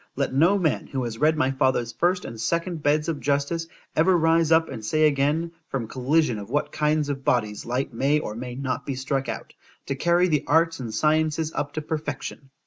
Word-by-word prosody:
Let -, -, -1 dB
no 170 Hz, +9 st, +4 dB
man, 165 Hz, -6 st, 0 dB
who 130 Hz, -2 st, -3 dB
has 115 Hz, -1 st, -5 dB
read 155 Hz, +1 st, +3 dB
my 130 Hz, -2 st, +2 dB
father's 130 Hz, -3 st, +1 dB
first 180 Hz, +5 st, 0 dB
and 115 Hz, -1 st, -7 dB
second 170 Hz, +4 st, -1 dB
beds 150 Hz, +2 st, +2 dB
of 160 Hz, -3 st, -2 dB
justice, 145 Hz, +4 st, -1 dB, 0.3 s
ever 180 Hz, +3 st, +4 dB
rise 165 Hz, 0 st, +3 dB
up 160 Hz, 0 st, +5 dB
and 110 Hz, -, -7 dB
say 155 Hz, +8 st, +2 dB
again, 150 Hz, +3 st, +1 dB, 0.2 s
from 125 Hz, -5 st, -3 dB
collision 130 Hz, -1 st, +1 dB
of 100 Hz, -, -9 dB
what 145 Hz, +4 st, -1 dB
kinds 150 Hz, -1 st, +1 dB
of 135 Hz, -1 st, -3 dB
bodies 110 Hz, -5 st, 0 dB
light 125 Hz, +1 st, -2 dB
may 135 Hz, +5 st, +2 dB
or 130 Hz, -8 st, -3 dB
may 125 Hz, +2 st, -6 dB
not 130 Hz, -1 st, -3 dB
be 135 Hz, -, -4 dB
struck 135 Hz, +1 st, -2 dB
out, -, -, -6 dB, 0.3 s
to 135 Hz, -, -2 dB
carry 175 Hz, +5 st, +3 dB
the 150 Hz, -5 st, +1 dB
arts 165 Hz, +1 st, +3 dB
and 120 Hz, -4 st, -5 dB
sciences 155 Hz, +5 st, +1 dB
up 145 Hz, 0 st, -3 dB
to 155 Hz, -, -4 dB
perfection. 145 Hz, -3 st, -5 dB
145 Hz, 210 wpm, -25 LUFS, 130-160 Hz, 0.3 s, up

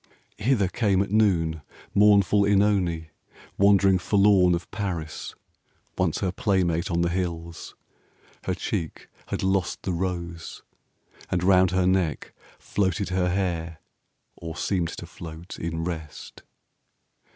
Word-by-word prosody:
Hither 110 Hz, -4 st, +2 dB
came 100 Hz, -1 st, +1 dB
at 100 Hz, -, -8 dB
noon 85 Hz, -7 st, +2 dB, 0.3 s
Mournful 100 Hz, 0 st, +5 dB
Oenone, 95 Hz, -5 st, +2 dB, 0.5 s
wandering 100 Hz, -1 st, +5 dB
forlorn 100 Hz, -1 st, +4 dB
15 -, -, +3 dB
Of 85 Hz, -, -7 dB
Paris, 90 Hz, -7 st, -4 dB, 0.6 s
once -, -, 0 dB
her 95 Hz, -, 0 dB
playmate 95 Hz, -6 st, 0 dB
on 85 Hz, 0 st, 0 dB
the 85 Hz, -, +1 dB
hills. 85 Hz, -2 st, -4 dB, 0.7 s
Her -, -, -1 dB
cheek 80 Hz, -, -4 dB, 0.2 s
had -, -, -3 dB
lost 95 Hz, -1 st, 0 dB
the 95 Hz, -, -2 dB
rose, 85 Hz, -1 st, -4 dB, 0.7 s
and 90 Hz, -1 st, 0 dB
round 95 Hz, -1 st, +5 dB
her 90 Hz, +1 st, +1 dB
neck 90 Hz, -5 st, 0 dB, 0.2 s
Floated 100 Hz, 0 st, -1 dB
her 90 Hz, -1 st, +1 dB
hair 85 Hz, -3 st, -2 dB, 0.6 s
or 80 Hz, -1 st, -7 dB
seemed 90 Hz, -4 st, 0 dB
to -, -, -7 dB
float 85 Hz, +1 st, -10 dB
in 80 Hz, 0 st, -3 dB
rest. 80 Hz, -3 st, -7 dB
90 Hz, 125 wpm, -25 LUFS, 85-100 Hz, 0.7 s, Mournful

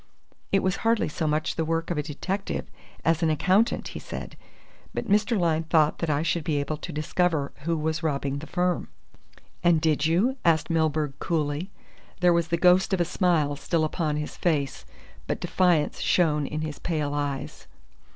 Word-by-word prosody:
It 195 Hz, -, +3 dB
was 185 Hz, 0 st, +1 dB
hardly 230 Hz, -1 st, +1 dB
so 155 Hz, +1 st, -2 dB
much 155 Hz, +1 st, -1 dB
the 165 Hz, -, +1 dB
work 165 Hz, +1 st, -1 dB
of 170 Hz, -, -1 dB
a -, -, +2 dB
detective 185 Hz, +7 st, -3 dB, 0.4 s
as 165 Hz, 0 st, +2 dB
an 165 Hz, -, +3 dB
accountant," 190 Hz, +8 st, +2 dB
he -, -, -7 dB
said, -, -, -7 dB, 0.6 s
"but -, -, -3 dB
Mr. 210 Hz, +3 st, +2 dB
Lyne 165 Hz, -2 st, +1 dB
thought 155 Hz, -2 st, +3 dB
that 165 Hz, -, -1 dB
I 150 Hz, +1 st, +1 dB
should 170 Hz, 0 st, 0 dB
be 155 Hz, -3 st, 0 dB
able 145 Hz, +2 st, -2 dB
to 170 Hz, -, -7 dB
discover 155 Hz, -1 st, 0 dB
who 165 Hz, -1 st, +1 dB
was 155 Hz, +1 st, -1 dB
robbing 140 Hz, -3 st, -1 dB
the 155 Hz, -, -9 dB
firm." 180 Hz, -1 st, 0 dB, 0.8 s
"And 170 Hz, -2 st, +5 dB
did 155 Hz, -1 st, +2 dB
you?" 210 Hz, +12 st, +2 dB
asked 165 Hz, 0 st, +2 dB
Milburgh 155 Hz, -3 st, +1 dB
coolly. 155 Hz, +2 st, -1 dB, 0.5 s
There 180 Hz, -1 st, +5 dB
was 170 Hz, -1 st, +1 dB
the 170 Hz, +1 st, 0 dB
ghost 180 Hz, +3 st, +4 dB
of -, -, -5 dB
a 175 Hz, -, +3 dB
smile 165 Hz, -5 st, +1 dB
still 160 Hz, +2 st, 0 dB
upon 155 Hz, -1 st, -1 dB
his 150 Hz, 0 st, -4 dB
face, 145 Hz, -6 st, -1 dB, 0.4 s
but -, -, -2 dB
defiance 175 Hz, -5 st, +1 dB
shone 150 Hz, -5 st, +2 dB
in 155 Hz, 0 st, -3 dB
his 155 Hz, -2 st, -5 dB
pale 150 Hz, -4 st, -2 dB
eyes. 145 Hz, -2 st, -4 dB
160 Hz, 180 wpm, -26 LUFS, 150-175 Hz, 0.8 s, And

